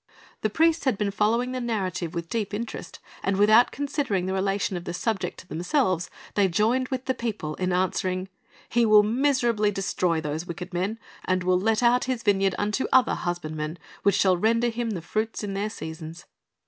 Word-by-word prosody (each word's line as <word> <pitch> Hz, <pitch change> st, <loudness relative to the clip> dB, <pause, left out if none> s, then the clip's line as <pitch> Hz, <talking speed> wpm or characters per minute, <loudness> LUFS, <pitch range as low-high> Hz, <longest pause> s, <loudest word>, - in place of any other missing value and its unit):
The 215 Hz, -, +1 dB
priests 325 Hz, +6 st, +2 dB
had 255 Hz, -6 st, +2 dB
been 205 Hz, -1 st, 0 dB
following 225 Hz, +5 st, +1 dB
the 255 Hz, 0 st, -3 dB
narrative 185 Hz, -7 st, -2 dB
with 170 Hz, -1 st, -3 dB
deep 210 Hz, 0 st, -2 dB
interest, 230 Hz, +2 st, -6 dB, 0.2 s
and 195 Hz, 0 st, 0 dB
without 215 Hz, +4 st, +6 dB
considering 275 Hz, -, -1 dB
the 190 Hz, -, -2 dB
relation 195 Hz, 0 st, 0 dB
of 175 Hz, 0 st, -5 dB
the -, -, -4 dB
subject 195 Hz, -2 st, -2 dB
to 180 Hz, -, -21 dB
themselves 185 Hz, -, 0 dB, 0.2 s
they 200 Hz, -2 st, +3 dB
joined 225 Hz, +8 st, +1 dB
with 260 Hz, -1 st, -4 dB
the 260 Hz, -, +1 dB
people 215 Hz, -11 st, -4 dB
in 185 Hz, 0 st, -1 dB
answering, 185 Hz, 0 st, 0 dB, 0.4 s
"He 240 Hz, 0 st, +2 dB
will 215 Hz, -2 st, +7 dB
miserably 235 Hz, -2 st, +2 dB
destroy 185 Hz, -4 st, 0 dB
those 155 Hz, +2 st, -4 dB
wicked 180 Hz, +1 st, -7 dB
men, 190 Hz, +5 st, -1 dB, 0.3 s
and 185 Hz, 0 st, +1 dB
will 180 Hz, 0 st, +3 dB
let 220 Hz, +4 st, +1 dB
out 245 Hz, +1 st, +4 dB
his 255 Hz, -2 st, -2 dB
vineyard 195 Hz, -2 st, +2 dB
unto 210 Hz, +5 st, 0 dB
other 260 Hz, -2 st, +5 dB
husbandmen, 155 Hz, -2 st, -3 dB, 0.2 s
which 200 Hz, -, +3 dB
shall 185 Hz, -2 st, +3 dB
render 230 Hz, +5 st, +2 dB
him 235 Hz, 0 st, -2 dB
the 185 Hz, -7 st, -4 dB
fruits 220 Hz, +4 st, -2 dB
in 200 Hz, -1 st, -3 dB
their 200 Hz, +2 st, -1 dB
seasons." 160 Hz, -3 st, -8 dB
205 Hz, 185 wpm, -26 LUFS, 180-230 Hz, 0.4 s, will